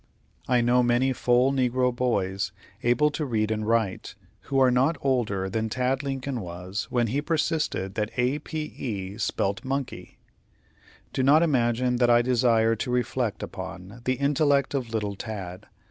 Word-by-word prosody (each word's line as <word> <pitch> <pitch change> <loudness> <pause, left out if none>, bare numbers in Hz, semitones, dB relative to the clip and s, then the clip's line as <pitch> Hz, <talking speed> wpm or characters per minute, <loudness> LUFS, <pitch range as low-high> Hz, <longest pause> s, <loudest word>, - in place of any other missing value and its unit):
I 125 -1 +3
know 120 +1 +3
many 125 +2 +2
full 125 +2 +3
negro 125 -1 +1
boys, 95 -6 -1 0.3
able 120 +5 +3
to 155 - -3
read 110 -5 0
and 110 -1 -2
write, 110 -4 0 0.3
who 135 - -1
are 130 -1 +5
not 135 +6 +2
older 110 -8 0
than 110 +3 -2
Tad 130 +3 0
Lincoln 135 -2 -3
was 90 +2 -5
when 120 -1 +1
he 130 +6 -1
persisted 155 - -1
that 105 +1 -1
A 125 +4 +1
p 155 +1 -5
e 100 -5 -5
spelt 100 0 -1
monkey. 135 0 -4 1.0
Do - - 0
not 145 +5 +5
imagine 125 -4 +1
that 120 -1 +3
I 120 0 +5
desire 115 -2 +3
to 120 - -3
reflect 125 -3 -1
upon 95 +6 -8
the 130 - +2
intellect 140 0 +2
of 130 -4 -2
little 105 -3 -2
Tad. 95 -4 -7
120 Hz, 160 wpm, -26 LUFS, 110-135 Hz, 1.0 s, are